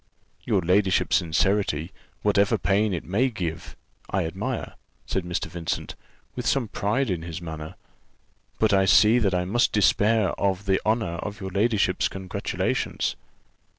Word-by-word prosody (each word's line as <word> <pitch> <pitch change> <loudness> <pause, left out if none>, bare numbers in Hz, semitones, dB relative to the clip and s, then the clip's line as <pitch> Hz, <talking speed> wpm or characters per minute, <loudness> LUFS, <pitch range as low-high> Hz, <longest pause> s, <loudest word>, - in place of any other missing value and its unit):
"Your 95 - +1
ladyship's 95 +2 +3
sincerity, 85 -1 0 0.3
whatever 105 +1 +3
pain 100 +3 +1
it 90 - -3
may 110 +10 +1
give 85 -8 -5 0.4
me, 95 - +1
I - - -2
admire," 80 - -4 0.3
said 95 - -2
Mr. 85 0 -2
Vincent, 85 0 -4 0.4
with - - -3
some 130 -6 +1
pride 105 +4 0
in 85 -3 -2
his 85 0 -6
manner; 80 -2 -7 0.8
"but 110 -2 +2
I 95 -1 +4
see 110 +5 +6
that 100 -5 +1
I 90 0 0
must 120 +6 +2
despair 105 0 +3
of 100 0 0
the 95 -1 +1
honour 110 -6 0
of 105 +5 -6
your 95 -1 -5
ladyship's 100 -1 +1
congratulations." 95 -2 -2
95 Hz, 150 wpm, -25 LUFS, 90-105 Hz, 0.8 s, see